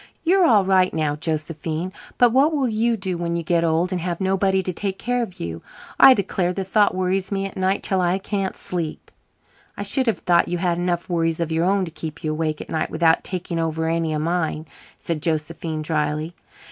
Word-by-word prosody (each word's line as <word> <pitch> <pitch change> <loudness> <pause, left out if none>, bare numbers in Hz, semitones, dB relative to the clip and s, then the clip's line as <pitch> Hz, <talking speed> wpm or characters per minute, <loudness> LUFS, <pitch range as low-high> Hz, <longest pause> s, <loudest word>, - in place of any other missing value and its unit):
You're 360 +1 +4
all 205 -5 +5
right 185 -1 +3
now, 155 -2 0
Josephine, 160 +2 -3 0.2
but 245 -1 +5
what 275 +6 +4
will 275 -3 +1
you 230 +1 +1
do 190 -3 -3
when 170 0 -2
you 170 - -2
get 170 +1 +1
old 165 +2 +1
and 180 -2 -2
have 175 -1 -3
nobody 190 0 +1
to 185 - -3
take 195 +2 -3
care 245 +4 -1
of 220 -6 -6
you? 85 0 -5 0.4
I 265 - +9
declare 185 -3 -1
the 195 - -3
thought 205 +1 +2
worries 185 +1 -1
me 195 -1 -1
at 195 - -7
night 190 +1 0
till 190 -1 +1
I 180 +1 +2
can't 195 -1 -3
sleep." 170 -4 -5 0.7
"I - - -3
should 265 -3 0
have 225 - +2
thought 175 -1 +2
you 175 - -1
had 175 -1 0
enough 175 -1 -1
worries 165 -2 0
of 165 -1 -2
your 165 +1 +1
own 195 0 +2
to 165 - -8
keep 160 +1 -7
you 155 - -1
awake 155 -1 -2
at - - -10
nights 155 - -1
without 165 0 +2
taking 180 -2 -4
over 160 0 -1
any 165 -1 0
of 155 0 -1
mine," 160 -2 -1 0.3
said 165 -3 -3
Josephine 160 0 -2
drily. 155 +1 -1
175 Hz, 215 wpm, -22 LUFS, 160-195 Hz, 0.7 s, I